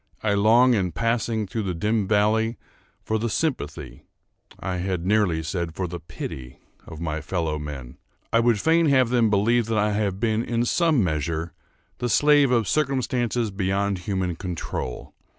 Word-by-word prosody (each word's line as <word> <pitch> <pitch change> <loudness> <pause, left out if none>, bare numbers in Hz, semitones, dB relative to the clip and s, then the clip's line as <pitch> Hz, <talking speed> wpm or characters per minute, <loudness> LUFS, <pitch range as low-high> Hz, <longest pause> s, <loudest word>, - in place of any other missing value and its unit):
I 105 -2 +2
long, 115 +5 +5
in 95 -6 0
passing 115 0 0
through 110 +3 -3
the 95 -4 -3
dim 105 +3 0
valley, 110 +2 +2 0.5
for 110 0 -1
the 115 +2 -1
sympathy—I 95 - -5
had 90 -1 -2
nearly 95 -5 +2
said 80 0 -3
for 95 - -2
the 85 0 -6
pity—of 65 +3 -9
my 80 -2 -3
fellow 80 -1 -2
men. 70 -4 -8 0.3
I 115 - +5
would 115 -2 +3
fain 165 +3 +3
have 130 -4 +4
them 120 -3 +3
believe 110 +3 +2
that 115 -1 0
I 105 0 +2
have 100 -2 -1
been, 110 0 +1
in 120 0 -1
some 160 - +2
measure, 80 0 -2 0.5
the 120 - -1
slave 145 +2 +5
of 115 -4 +2
circumstances 125 -4 0
beyond 95 0 -1
human 90 -1 -2
control. 85 -9 -5
105 Hz, 155 wpm, -24 LUFS, 90-115 Hz, 0.5 s, long